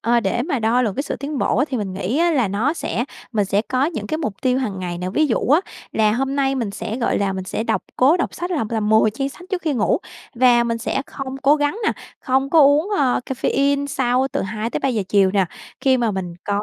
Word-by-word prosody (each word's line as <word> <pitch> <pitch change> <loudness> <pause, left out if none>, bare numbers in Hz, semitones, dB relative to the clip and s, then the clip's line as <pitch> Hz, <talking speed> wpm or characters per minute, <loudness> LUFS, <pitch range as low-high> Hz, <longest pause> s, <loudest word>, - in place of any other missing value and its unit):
ờ, 235 0 +2
để 220 +4 0
mà 280 -2 -1
đo 230 +3 +2
lường 210 -5 -1
cái 275 - -1
sự 285 - -4
tiến 285 0 -4
bộ - - +1
á 270 - +3
thì 260 - -2
mình 205 -4 -3
nghĩ 195 +8 -2
á, 340 +1 +3
là 255 - +2
nó 225 +10 0
sẽ 240 - -2 0.3
mình 210 -2 +2
sẽ 200 +2 +1
có 255 +3 0
những 330 - -3
cái 310 - -2
mục 215 -11 -3
tiêu 255 0 +2
hằng 210 -8 -3
ngày 175 -1 -4
nè. 180 +1 -3
Ví 310 +9 +2
dụ 245 - +1
á 300 +6 +5 0.3
là 215 -1 +3
hôm 270 +3 -1
nay 270 -1 +1
mình 235 -6 -2
sẽ, 225 +2 -5
gọi 240 - 0
là, 200 -1 0
mình 190 -1 -4
sẽ 215 - -3
đọc 225 - 0
cố 275 +7 +5
đọc 355 - -2
sách 350 +1 -4
là 320 -10 0
là 225 - 0
10 215 0 +4
trang 270 +5 -3
sách 280 - -13
trước 375 -3 -2
khi 310 -3 0
ngủ. 225 +3 +1 0.4
Và 240 -1 +4
mình 230 -1 -1
sẽ 250 +3 -2
không 270 -1 -6
cố 285 +3 +5
gắng 290 +7 0
nè, - - +3 0.3
không 270 +1 0
có 325 - +6
uống, 290 +5 +5
ờ, 255 -4 +2
caffeine 280 +2 0
sau 260 -3 +1
từ - - -1
2:00-3:00 220 +3 -2
chiều 195 -1 +4
nè. 195 -1 +2 0.4
Khi 265 -1 +3
mà 235 -3 +1
mình 180 -3 -4
có 205 0 -1
250 Hz, 260 wpm, -21 LUFS, 215-280 Hz, 0.4 s, có